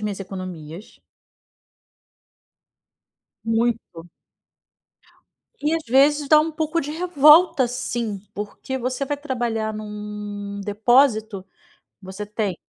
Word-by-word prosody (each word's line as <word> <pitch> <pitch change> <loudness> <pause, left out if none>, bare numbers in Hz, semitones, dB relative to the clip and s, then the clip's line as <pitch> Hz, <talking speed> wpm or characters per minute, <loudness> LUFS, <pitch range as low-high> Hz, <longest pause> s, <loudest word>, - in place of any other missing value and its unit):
minhas 210 -2 -4
economias. 185 -2 -8 2.4
Muito. 225 -7 -1 1.5
E 300 +2 0
às 330 - -2
vezes 280 +3 +3
dá 305 -1 +7
um 320 +1 -1
pouco 315 +1 -1
de 285 - -5
revolta, 320 -3 +5
sim, 235 -5 -3
porque 210 +5 -5
você 255 +2 -2
vai 290 +1 -2
trabalhar 235 -6 -2
num 210 -1 -6
depósito, 220 -1 +2 0.6
você 190 +2 -7
tem 210 -3 -3
225 Hz, 95 wpm, -22 LUFS, 205-285 Hz, 2.4 s, dá